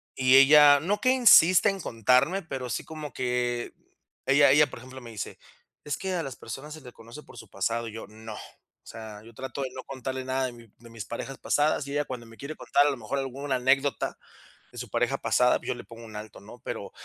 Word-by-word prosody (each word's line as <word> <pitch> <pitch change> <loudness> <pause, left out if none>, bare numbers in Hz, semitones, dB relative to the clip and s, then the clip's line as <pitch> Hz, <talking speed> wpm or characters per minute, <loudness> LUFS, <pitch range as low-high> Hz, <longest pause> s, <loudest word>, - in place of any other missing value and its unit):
Y 130 0 +4
ella 145 +1 +8
no 195 +7 -1
que 255 - +3
insiste 215 -7 +6
en 195 -2 -4
contarme, 125 - +2
pero 135 -6 -6
sí - - -3
como 155 -3 -8
que 125 -1 -2 0.5
ella 140 0 +6
ella, 150 +2 +5
por - - -10
ejemplo, 130 +1 -11
me 120 - -11
dice: 105 -3 -7 0.4
"Es 150 - -3
que 190 0 -3
a 175 -2 -1
las 135 -4 -6
personas 150 +3 -8
se 155 - -12
le 125 -2 -12
conoce 115 +6 -12
por - - -16
su 110 - -12
pasado", 115 +5 -2
y 110 - -8
yo: 115 - -7
"No". 110 0 -10
O - - -16
sea, 110 -2 -10
yo 115 +1 -15
trato 130 +3 -6
de 130 - -3
no 130 0 -8
contarle 130 -1 -5
nada 130 0 -1
de 130 - -4
mi 115 -1 -15
de 120 - -16
mis 115 -3 -7
parejas 135 +3 -6
pasadas, 145 -1 +1
y 140 - -6
ella 145 0 0
cuando 120 -3 -7
me 115 - -15
quiere 145 +3 -7
contar, 145 - +2
a - - +2
lo 135 - -5
mejor, 115 +4 -4
alguna 135 +1 -3
anécdota 135 +2 +1 0.5
de - - -14
su - - -6
pareja - - 0
pasada, - - +2
yo - - -2
le - - -10
pongo 115 0 -12
un 110 -1 -12
alto, 105 -1 -10
¿no? 110 +4 -13
Pero - - -6
130 Hz, 235 wpm, -27 LUFS, 115-145 Hz, 0.5 s, ella